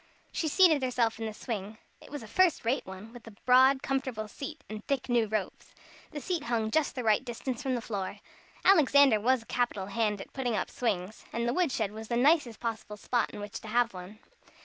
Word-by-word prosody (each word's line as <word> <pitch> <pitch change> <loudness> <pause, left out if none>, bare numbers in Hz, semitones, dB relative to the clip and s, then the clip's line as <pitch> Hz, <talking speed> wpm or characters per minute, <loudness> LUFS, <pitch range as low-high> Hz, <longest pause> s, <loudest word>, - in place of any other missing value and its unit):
She 320 - -1
seated 315 -2 +5
herself 240 -3 0
in 225 - -3
the 215 - -5
swing. 215 -3 -5 0.2
It - - -14
was 290 -4 -6
a - - -10
first 345 - +2
rate 245 -1 0
one, 190 +4 -9
with 240 -2 -12
a 220 - -11
broad, 260 +2 +5
comfortable 260 -5 -2
seat, 290 +7 -8
and 215 0 -7
thick 275 -2 -1
new 235 -2 +3
ropes. 210 -2 -4 0.3
The 295 - -6
seat 340 0 -3
hung 225 -2 0
just 315 +3 +1
the 250 - -3
right 220 +2 +3
distance 245 0 -4
from 260 -2 -1
the 240 - -2
floor. 200 -3 -4 0.5
Alexander 285 - +6
was 245 +2 +2
a - - -25
capital 240 -6 -1
hand 210 0 -1
at - - -10
putting 250 -4 -1
up - - -2
swings, 210 -4 -2
and 235 +1 -1
the 240 - +1
wood 350 -2 +1
shed 215 -4 -1
the 220 +2 -3
nicest 265 -4 +3
possible 220 -2 -4
spot 240 +3 0
in - - -9
which 205 0 -7
to - - -10
have 235 +1 +1
one. 185 +3 -9
235 Hz, 215 wpm, -29 LUFS, 215-265 Hz, 0.5 s, Alexander